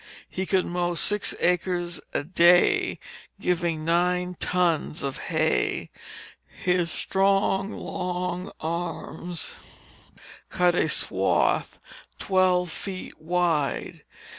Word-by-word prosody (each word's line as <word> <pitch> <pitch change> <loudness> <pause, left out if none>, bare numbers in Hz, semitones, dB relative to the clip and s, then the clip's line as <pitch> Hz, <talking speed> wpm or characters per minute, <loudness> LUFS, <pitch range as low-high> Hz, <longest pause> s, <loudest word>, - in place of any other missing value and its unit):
He 190 0 -4
could 190 -2 +2
mow 175 0 -1
six 205 +4 0
acres 175 0 0
a - - -1
day, 175 +2 +4 0.4
giving 170 -3 -1
nine 180 +2 +1
tons 170 -5 0
of 135 -1 -3
hay; - - +1 0.6
his 180 -2 0
strong, 195 +2 +1
long 180 0 -3
arms 170 +1 -4 1.0
cut 180 0 +3
a - - +1
swath - - +1 0.4
twelve 185 -2 +2
feet 185 -3 -6
wide. 165 -3 0
180 Hz, 90 wpm, -26 LUFS, 170-180 Hz, 1.0 s, day